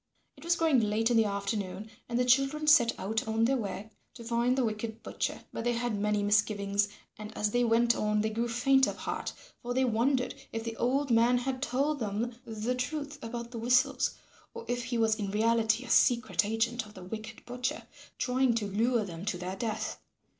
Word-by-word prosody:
It - - -15
was 340 +1 +2
growing 320 -6 +3
late 220 +2 +1
in 235 - +4
the 225 - +5
afternoon 200 0 -3 0.2
and 235 - -1
the 250 - +2
children 275 +4 +3
set 270 -7 +5
out 220 +3 -2
on 220 +1 +2
their 270 +3 +2
way 215 -2 -4 0.2
to 235 - -10
find 235 +2 +1
the 260 - +2
wicked 220 0 -4
butcher. - - -3
But - - -4
they 240 0 +1
had 240 0 -1
many 210 0 0
misgivings, 205 -1 +2 0.3
and 215 0 -7
as 210 0 +1
they 245 +2 +2
went 235 +1 +3
on 210 0 +1
they 220 +1 -1
grew 230 +2 -1
faint 265 +3 +3
of - - -3
heart, - - -4 0.3
for 245 0 -4
they 260 0 +3
wondered 250 +3 +1 0.2
if 225 0 -4
the 230 0 -4
old 270 +2 +1
man 235 +2 +4
had 255 +1 -3
told 280 +3 0
them 225 +2 -2
the 220 +2 -2
truth 290 +3 -4
about 235 +1 -5
the 235 - -5
whistles 245 +2 +2 0.4
or 465 - -7
if 245 -1 -2
he 240 0 -2
was 220 -1 +2
in 205 -3 -3
reality 220 +2 +2
a - - -10
secret 245 -1 +4
agent 225 +2 0
of 210 - -16
the 185 - -9
wicked 220 +3 -8
butcher 245 +1 -3 0.3
trying 250 -1 +2
to 225 -2 -1
lure 225 +3 +1
them 170 -2 -8
to 210 -4 -1
their 180 +1 -5
death. 220 -1 -3
230 Hz, 205 wpm, -30 LUFS, 215-250 Hz, 0.4 s, the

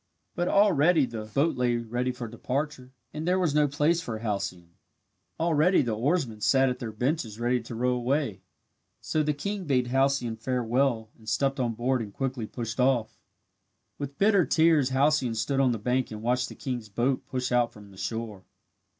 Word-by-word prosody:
But 175 0 -1
already 175 -6 +4
the 115 -3 -6
boat 140 +10 +1
lay 125 -1 +1
ready 120 +2 -2
for 125 -1 -6
departure 130 +3 -4 0.2
and 155 +2 -4
there 180 +1 +3
was 175 -6 +1
no 150 0 +4
place 150 +4 +1
for 115 -8 -4
Halcyone. 95 -6 -4 0.7
Already 165 +2 +3
the 120 -3 -1
oarsmen 125 -3 0
sat 135 +3 +4
at 125 - -3
their 115 -2 -5
benches 115 -1 -2
ready 120 +1 +1
to 115 +1 -8
row 125 +2 +1
away. 125 -4 -1 0.6
So 155 - -1
the 150 0 +1
king 200 +5 -4
bade 125 -4 +1
Halcyone 135 -3 +1
farewell 120 -1 0
and 110 0 -8
stepped 135 +4 0
on 120 -3 0
board 125 +2 0
and 105 -3 -6
quickly 130 -1 -3
pushed 115 +1 -5
off. 125 -3 +1 0.8
With 140 -1 -5
bitter 200 -2 +4
tears 160 -5 +3
Halcyone 135 -2 +2
stood 125 +5 0
on 130 -2 +4
the 115 - -1
bank 125 +4 0
and 110 0 -8
watched 125 +1 +1
the - - -10
king's 120 -5 -5
boat 120 +6 -1
push 130 -1 -3
out 120 -1 +2
from 100 -2 -14
shore. 110 -1 -5
125 Hz, 180 wpm, -27 LUFS, 115-145 Hz, 0.8 s, already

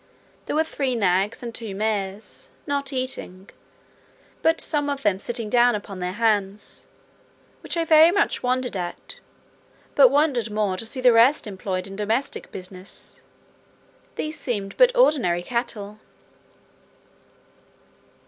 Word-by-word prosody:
There - - -2
were 315 - +3
three 275 -5 -2
nags 195 +1 +1
and 235 -1 -5
two 225 -4 -5
mares, 205 -1 -3 0.2
not 280 -1 -2
eating, 255 -8 -4 0.9
but 325 +1 +3
some 290 -2 +1
of 280 -1 -3
them 200 -3 +2
sitting 235 0 -4
down 240 +1 +4
upon 200 -2 -7
their 180 0 -3
hams, 210 -2 -1 0.7
which - - -3
I 335 - +1
very 320 +1 +7
much 400 +3 +1
wondered 250 -2 -1
at; 175 -2 -6 0.7
but 270 -3 +7
wondered 275 -5 +1
more 210 -3 0
to 220 +4 -5
see 255 +3 -4
the 250 -1 +6
rest 235 +6 +5
employed 190 -2 -4
in 195 0 -7
domestic 225 +7 -2
business; 185 0 -7 0.9
these 310 0 -4
seemed 205 -6 -3
but - - +6
ordinary 255 - +3
cattle. 215 -3 -3
230 Hz, 130 wpm, -24 LUFS, 195-275 Hz, 0.9 s, very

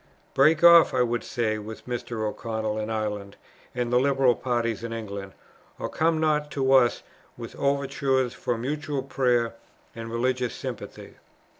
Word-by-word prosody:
Break 155 +4 +4
off, 170 -4 +8
I 125 - +4
would 120 -1 -1
say, 110 -3 -1
with 110 +1 -9
Mr. 120 -3 -3
O'Connell 110 0 -3
in 110 0 -3
Ireland 105 -2 -3 0.4
and 125 -1 -2
the 125 - +5
liberal 135 -2 +3
party 120 -1 -1
in 115 0 -5
England, 100 -4 -6 0.4
or - - -4
come 160 0 +1
not 150 -1 +1
to 135 -1 +1
us 125 -3 +4 0.3
with - - -8
overtures 140 -2 0
for 120 - -2
mutual 145 +2 -3
prayer 125 -4 +1 0.4
and 115 0 -7
religious 125 +1 -1
sympathy." - - -8
125 Hz, 150 wpm, -26 LUFS, 115-135 Hz, 0.4 s, off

